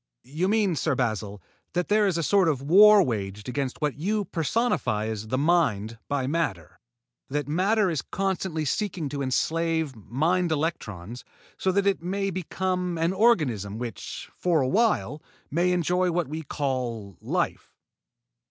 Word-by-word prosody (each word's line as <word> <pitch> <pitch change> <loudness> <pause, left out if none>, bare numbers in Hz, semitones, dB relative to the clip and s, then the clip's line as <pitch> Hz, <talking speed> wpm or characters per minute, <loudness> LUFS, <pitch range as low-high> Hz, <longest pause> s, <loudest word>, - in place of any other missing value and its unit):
"You 155 +8 -2
mean, 205 -4 +2
Sir 150 0 0
Basil, 110 -5 -2 0.3
that 180 0 0
there 210 0 +3
is 180 -4 0
a 165 - 0
sort 195 +3 +3
of 145 -5 0
war 205 +6 +7
waged 105 - -4
against 130 +2 -3
what 145 -2 0
you 205 +5 0
personify 165 - 0
as 110 -1 -4
the 130 - -1
Mind 130 - +1
by 140 -2 -1
matter; 130 - -2 0.5
that 145 0 -2
matter 195 +7 +2
is 165 -6 -1
constantly 190 -4 -2
seeking 175 -1 -2
to 140 0 -4
enslave 160 +2 0
mind 160 - 0
electrons, 120 - -3 0.3
so 190 - 0
that 200 +1 +2
it 200 -3 +2
may 195 +3 -2
become 180 0 -2
an 165 +3 +1
organism 145 - +2
which, 115 -6 -6
for 170 -4 +1
awhile, 180 - +1 0.3
may 175 +4 +2
enjoy 180 +1 +1
what 170 -3 0
we 155 +3 -5
call 125 - -3
life?" - - -2
160 Hz, 150 wpm, -26 LUFS, 125-185 Hz, 0.5 s, war